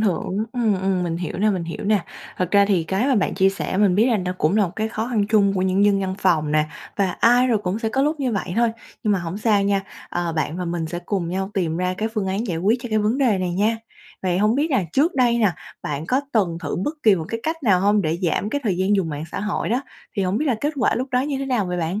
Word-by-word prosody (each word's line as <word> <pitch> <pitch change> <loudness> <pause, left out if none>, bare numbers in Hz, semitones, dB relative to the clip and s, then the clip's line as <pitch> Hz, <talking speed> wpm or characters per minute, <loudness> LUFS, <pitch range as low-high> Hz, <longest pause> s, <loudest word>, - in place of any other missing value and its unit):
hưởng, 190 -2 0
ừm, 220 -7 +1
ừm, 190 -1 0
mình 170 -1 -2
hiểu 175 0 -4
nè, 215 +2 +3
mình 185 -4 -2
hiểu 165 - -6
nè. 205 -3 +2 0.3
Thật 180 -1 -1
ra 200 -1 +5
thì 185 -5 +1
cái 195 +9 0
mà 275 - +3
bạn 205 - +1
chia 190 0 +4
sẻ 195 -1 -3
mình 200 -2 +4
biết 220 +5 +4
là 235 -4 +3
nó 180 -2 -2
cũng 165 +7 +2
là 210 - +4
một 170 - -8
cái 220 0 -1
khó 220 +1 -3
khăn 220 -5 +1
chung 205 -2 +4
của 185 - 0
những 190 +2 +2
dân 200 -1 +3
văn 190 -1 -2
phòng 155 -6 +2
nè, 155 0 +3 0.3
và 195 -3 +1
ai 245 +6 +4
rồi 235 -4 +2
cũng 195 0 -2
sẽ 225 - -1
có 265 +5 0
lúc 300 +1 0
như 255 -3 0
vậy 190 -3 -2
thôi. 235 -1 +3 0.3
Nhưng 210 - +2
mà 195 - +2
hổng 175 +3 -5
sao 210 -2 +2
nha, 200 -1 +1 0.3
ờ, 175 -1 -2
bạn 160 +1 -2
và 180 - -3
mình 170 -1 -2
sẽ 175 +2 -4
cùng 175 -1 -3
nhau 190 +2 -2
tìm 170 -4 0
ra 180 +1 -1
cái 220 - 0
phương 210 -4 -1
án 195 +5 -1
giải 175 -6 -2
quyết 210 +8 +2
cho 245 - -5
cái 215 -1 +1
vấn 215 +6 +1
đề 235 -8 +3
này 185 -1 -1
nha. 215 +4 +2 0.5
Vậy 180 -1 +1
hổng 210 +3 +3
biết 300 +4 0
là 255 -9 +2
trước 310 +6 +2
đây 245 -3 +3
nè, 210 -5 +3 0.3
bạn 150 +2 -4
có 260 +6 +2
từng 180 -7 +1
thử - - -3
bất 295 - -2
kỳ 215 -3 +6
một 160 - -4
cái 230 - -3
cách 320 -1 -3
nào 190 -6 +4
hông, 205 +1 +3
để 160 0 -1
giảm 185 +4 0
cái 285 - -1
thời 195 -5 +1
gian 190 +3 +2
dùng 185 -4 0
mạng 150 0 -4
xã - - -3
hội 210 +1 -2
đó, 245 +4 0 0.3
thì 195 - +1
hổng 190 +3 0
biết 305 - -1
là 255 - +2
kết 295 +2 0
quả 255 - +2
lúc 255 +3 -2
đó 250 - +2
như 275 0 -2
thế 275 - -3
nào 245 -8 0
vậy 180 - -2
bạn? 175 +5 -2
200 Hz, 300 wpm, -22 LUFS, 180-230 Hz, 0.5 s, kỳ